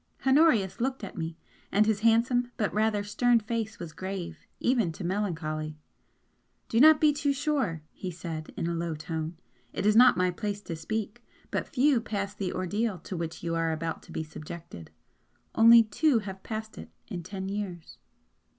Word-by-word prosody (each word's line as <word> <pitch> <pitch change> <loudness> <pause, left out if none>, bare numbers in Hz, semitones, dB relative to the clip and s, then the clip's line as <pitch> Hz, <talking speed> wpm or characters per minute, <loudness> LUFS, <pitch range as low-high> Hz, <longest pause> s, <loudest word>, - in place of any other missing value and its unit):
Honorius 265 - +4
looked 260 -1 -1
at 200 - -7
me, 165 -1 -4 0.3
and 210 +1 +4
his 215 -2 +1
handsome 235 +2 +3
but 210 - 0
rather 215 -1 +1
stern 235 +3 +3
face 225 0 -3
was 170 -3 -8
grave 185 -4 -6
even 235 -9 +2
to 175 - -8
melancholy. 160 -5 -2 0.9
"Do 230 - +2
not 310 +3 +8
be 300 -1 +5
too 285 -1 0
sure!" 275 - -1
he 185 - -6
said, 165 -2 -6
in - - -1
a 170 - -1
low 170 -1 -2
tone 160 +2 -4 0.4
"It - - -2
is 210 0 +4
not 245 -4 +7
my 180 0 +2
place 205 +2 -4
to 170 - -5
speak, 215 +7 -4 0.3
but - - -1
few 270 -2 +3
pass 200 -3 -3
the 195 -3 -3
ordeal 200 +3 -1
to 180 +3 -7
which 165 -1 -5
you 165 -1 -1
are 165 0 +1
about 160 0 -3
to - - -15
be 160 - -3
subjected. 155 - -9 0.6
Only 230 +1 +8
two 255 +5 +2
have 195 -3 -5
passed 220 0 -6
it - - -9 0.2
in 180 -6 -4
ten 190 +2 -6
years." 195 -4 -5
200 Hz, 180 wpm, -28 LUFS, 170-230 Hz, 0.9 s, not